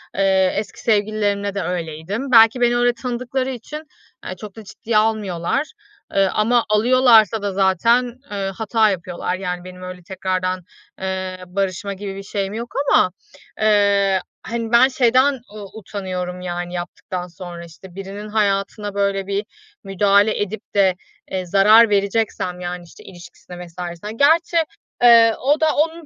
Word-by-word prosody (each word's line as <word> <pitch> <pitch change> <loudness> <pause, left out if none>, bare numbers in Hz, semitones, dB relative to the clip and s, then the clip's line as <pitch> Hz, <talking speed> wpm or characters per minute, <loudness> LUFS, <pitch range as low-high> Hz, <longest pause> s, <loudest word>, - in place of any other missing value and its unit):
Eee, 190 -1 +3
eski 205 -1 -5
sevgililerimde 205 -2 0
de 200 - -1
öyleydim. 180 - -4
Belki 225 +1 +6
beni 240 0 +3
öyle 245 0 +3
tanıdıkları 255 +2 -3
için, 265 +5 -7 0.4
eee, 185 - -5
çok 205 +1 -10
da 220 - -10
ciddiye 215 +2 -2
almıyorlar. 215 - 0 0.4
E, 195 - +2
ama 225 +5 +1
alıyorlarsa 225 -1 +4
da 200 -1 -2
zaten, 230 +6 +2
eee, 195 -1 -3
hata 220 0 +2
yapıyorlar 180 -1 -3
yani 180 -2 -4
benim 180 0 -11
öyle 180 -1 -8
tekrardan, 185 0 -3 0.4
eee, 185 -1 -4
barışma 195 +1 -2
gibi 195 0 -7
bir 195 - -7
şeyim 195 0 -3
yok 235 +2 -6 0.2
ama, 185 - +4 0.5
eee, 200 -2 +3 0.2
hani, 230 -1 -4
ben 240 +2 +6
şeyden 260 +1 +2 0.2
u 210 +1 -9
utanıyorum; 180 -3 -5
yani 175 0 -5
yaptıktan 180 +1 -5
sonra, 175 -1 -9
işte, 175 +2 -15
birinin 195 +2 -7
hayatına 205 0 -1
böyle 200 -1 -1
bir 200 +1 -2 0.4
müdahale 200 +2 +2
edip 205 +1 -3
de, 190 -2 +4 0.4
eee, 185 -1 -2
zarar 210 +5 +6
vereceksem 200 -3 -1
yani, 180 0 -5
işte, 170 - -16
ilişkisine 175 0 -12
vs.ne 175 +3 -7
Gerçi, 320 +7 +3 0.5
eee, 230 -2 +7
o 290 +4 +2
da 315 -1 +2
onun 325 +2 -1
200 Hz, 145 wpm, -20 LUFS, 185-225 Hz, 0.5 s, eee